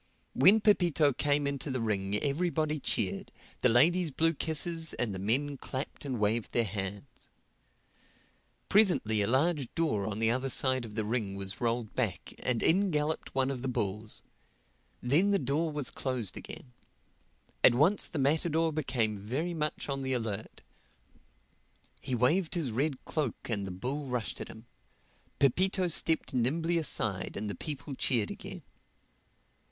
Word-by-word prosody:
When 195 - +6
Pepito 170 -9 +3
came 145 +2 +1
into 140 +1 -2
the 130 -1 -2
ring 100 -3 0
everybody 155 +1 0
cheered, - - -1 0.3
the 125 - +3
ladies 165 +9 +4
blew 165 +4 +1
kisses 160 +1 +2
and 120 -5 -2
the 95 - -5
men 135 +8 0
clapped 130 +2 -6
and 130 -4 -3
waved 105 +2 0
their 120 - +3
hats. 100 +3 -6 1.4
Presently 175 - +3
a 100 - +2
large 140 +2 +1
door 110 -12 0
on 105 -2 -3
the 115 +1 +2
other 130 +2 -1
side 130 -1 +1
of 105 -2 -10
the 110 -2 -1
ring 105 -3 -2
was 100 +2 -5
rolled 115 -2 -1
back 110 -11 -3
and 125 -3 -1
in 195 +4 +4
galloped 150 0 -2
one 135 0 +2
of 130 -3 -5
the 135 - -3
bulls; 105 -3 -3 0.8
then 150 +11 +4
the 200 - +3
door 155 +2 0
was 145 -4 0
closed 125 -8 -2
again. 125 - -9 0.9
At 120 - +7
once 165 +10 +3
the - - -6
matador 160 +3 +1
became 120 -8 0
very 135 - -3
much 150 -2 -3
on 135 -1 -3
the 130 0 -1
alert. 110 -3 -4 1.4
He 130 - -2
waved 155 +10 +2
his 155 -8 -1
red 135 +3 -2
cloak 140 -6 -3
and 100 -3 0
the - - -5
bull 135 +10 -4
rushed 125 -4 -3
at - - -5
him. 110 +1 -12 0.7
Pepito 185 +7 +2
stepped 160 -2 +1
nimbly 160 +8 +1
aside 110 - -1
and 105 - -3
the 100 - -3
people 140 - -5
cheered 120 -5 +1
again. - - -8
130 Hz, 155 wpm, -30 LUFS, 115-155 Hz, 1.4 s, At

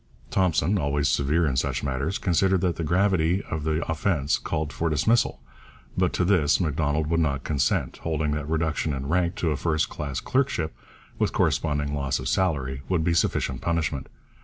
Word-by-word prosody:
Thompson, 95 +1 +2
always 70 -2 0
severe 75 +4 +2
in 70 -4 0
such - - -1
matters, 70 +7 -1
considered 95 0 +2
that 90 -3 +1
the 85 - -2
gravity 90 +1 +2
of 80 -2 -2
the 80 +1 0
offence 80 -3 0
called 75 -2 -3
for 85 - -1
dismissal, 110 - +1 0.5
but 90 -1 +2
to 90 - +1
this 85 -5 +3
Macdonald 75 -2 0
would 85 +2 +1
not 70 -4 0
consent, 70 -4 0
holding 80 -2 -1
that 75 0 -3
reduction 80 -1 0
in 70 0 -4
rank 85 0 +1
to 80 - 0
a - - 0
first 80 +1 0
class 70 -4 -4
clerkship, 125 - 0 0.4
with - - +1
corresponding 75 -1 0
loss 70 -2 -1
of 65 - -5
salary, 65 -4 0
would 90 -4 +1
be 85 0 +2
sufficient 65 -6 0
punishment. 80 -5 -1
80 Hz, 175 wpm, -25 LUFS, 70-85 Hz, 0.5 s, this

